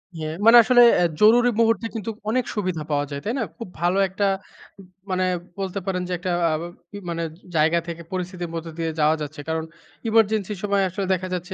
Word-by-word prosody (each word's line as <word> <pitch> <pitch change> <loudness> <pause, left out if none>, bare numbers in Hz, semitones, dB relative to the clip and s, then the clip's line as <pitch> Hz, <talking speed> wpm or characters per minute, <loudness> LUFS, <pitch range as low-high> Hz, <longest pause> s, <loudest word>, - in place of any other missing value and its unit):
হ্যাঁ, 155 0 -4
মানে 235 +1 +9
আসলে 245 +1 +5 0.2
অ্যা 175 - +3
জরুরি 240 +3 +6
মুহূর্তে 230 0 +2
কিন্তু 225 0 -4 0.2
অনেক 250 +1 +1
সুবিধা 185 -6 -2
পাওয়া 145 0 +1
যায় 140 0 -4
তাই 225 - -1
না? - - +1
খুব 230 - -7
ভালো 175 +2 +2
একটা 200 +2 -1 0.9
মানে 185 0 +1 0.3
বলতে 195 0 -3
পারেন 185 -2 -1
যে 180 - -3
একটা 180 0 -2 0.2
আ - - 0
আ - - -5 0.2
কি 205 - -7
মানে 170 0 -2 0.3
জায়গা 160 +2 +3
থেকে 170 0 -6
পরিস্থিতির 180 -1 -4
মধ্যে 165 0 -5
দিয়ে 165 -1 -1
যাওয়া 155 +1 +4
যাচ্ছে 150 0 -6
কারণ 160 0 -1 0.5
ইমার্জেন্সির 215 -3 +2
সময় 200 -1 +2
আসলে 190 +2 -3
দেখা 185 0 -2
যাচ্ছে 180 +1 -4
185 Hz, 200 wpm, -23 LUFS, 165-210 Hz, 0.9 s, মানে